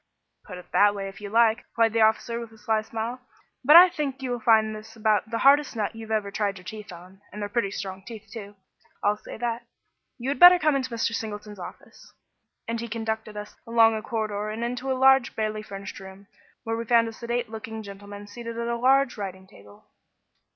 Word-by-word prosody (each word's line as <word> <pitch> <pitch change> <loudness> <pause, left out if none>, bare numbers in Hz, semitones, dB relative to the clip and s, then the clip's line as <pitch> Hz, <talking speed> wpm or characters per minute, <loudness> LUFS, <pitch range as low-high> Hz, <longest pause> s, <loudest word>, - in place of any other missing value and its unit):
"Put 180 - -9
it 180 - -14
that 205 0 +5
way 195 -1 -4
if 195 +2 -13
you 205 - -6
like," 225 +1 +4
replied 230 -2 0
the 225 - +2
officer, 220 +2 +2
with 230 -1 -8
a 220 - -17
sly 220 0 0
smile, 225 +3 -5 0.4
"but 295 +5 +7
I 355 +2 +11
think 285 -6 -4
you 255 - -2
will 245 - -2
find 220 -1 +3
this 215 +1 -11
about 215 0 +1
the 230 - -2
hardest 280 +2 +4
nut 215 0 -2
you 225 -1 -9
ever 210 -2 -1
tried 200 -1 -1
your 180 - -14
teeth 210 -1 -8
on 180 +3 -13
and 210 - -8
they're 205 - -3
pretty 205 -1 -1
strong 190 -1 -6
teeth 220 0 -10
too, 205 -3 -9 0.5
I'll 205 +1 +2
say - - -10
that. 235 0 -3 0.5
You 255 +1 -4
had 280 - -2
better 355 +1 +10
come 305 -3 +2
into 260 -1 -1
Mr. 230 -1 -1
Singleton's 210 -2 -6
office," 175 - -12 0.6
and 230 0 -2
he 235 - -5
conducted 220 -1 -4
us 210 0 -8
along 230 -1 +5
a 215 - -3
corridor 215 -2 -3
and 220 +2 -4
into 250 +2 -3
a 260 - 0
large, 265 -1 +4
barely 215 -1 -2
furnished 195 -2 -8
room, 190 +1 -12 0.4
where 225 -1 -2
we 230 - -3
found 230 0 +3
a 225 - -6
sedate 235 0 -3
looking 220 0 -7
gentleman 205 0 -10
seated 230 +2 -8
at 235 0 -3
a 235 - -1
large 265 +1 +3
writing 190 -1 -6
table. 100 - -18
220 Hz, 220 wpm, -25 LUFS, 205-235 Hz, 0.6 s, I